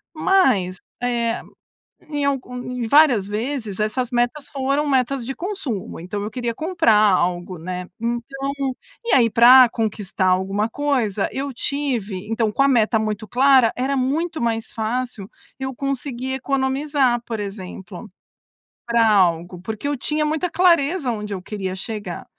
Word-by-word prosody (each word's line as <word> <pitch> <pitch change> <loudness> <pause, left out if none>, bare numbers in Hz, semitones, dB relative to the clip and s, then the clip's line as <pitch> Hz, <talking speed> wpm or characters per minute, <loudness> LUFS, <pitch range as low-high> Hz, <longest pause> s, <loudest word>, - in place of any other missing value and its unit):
mas 260 - +2 0.3
eh, 235 -2 0 0.7
em 290 -2 -1
algu 270 -3 -2
em 250 -1 -4
várias 265 -7 +5
vezes 220 -1 -3
essas 230 +4 -1
metas, 245 +4 0
foram 275 +2 0
metas 265 -2 +1
de 270 - -3
consumo. 340 - -4
Então 190 +4 -5
eu 210 - -3
queria 240 -2 -3
comprar 320 -5 +2
algo, 180 -3 +2
né? 180 +2 -5
Então 240 +4 -3 0.5
e - - +1
aí 240 -3 +5
para 250 +3 +8
conquistar 210 -5 -2
alguma 195 +4 +1
coisa, 245 -8 0
eu 275 +1 -3
tive, 235 -8 -2
então, 225 -1 0
com 275 - 0
a - - +4
meta 225 -4 +3
muito 215 0 -3
clara, 260 -2 +4
era 265 +2 -1
muito 315 +6 -1
mais 225 -1 -1
fácil. 225 -2 -3 0.3
Eu 265 0 -3
conseguir 265 -1 -3
economizar, 265 -1 +1
por 225 -2 -4
exemplo, 195 0 -8 0.8
pra 235 -1 +3
algo, 175 -3 +2
porque 220 +8 -4
eu 290 - -1
tinha 300 +4 -1
muita 315 +4 0
clareza 335 -5 +3
onde 210 -3 -4
eu 185 - -6
queria 190 -2 -4
chegar. 205 -3 -6
240 Hz, 145 wpm, -21 LUFS, 210-275 Hz, 0.8 s, para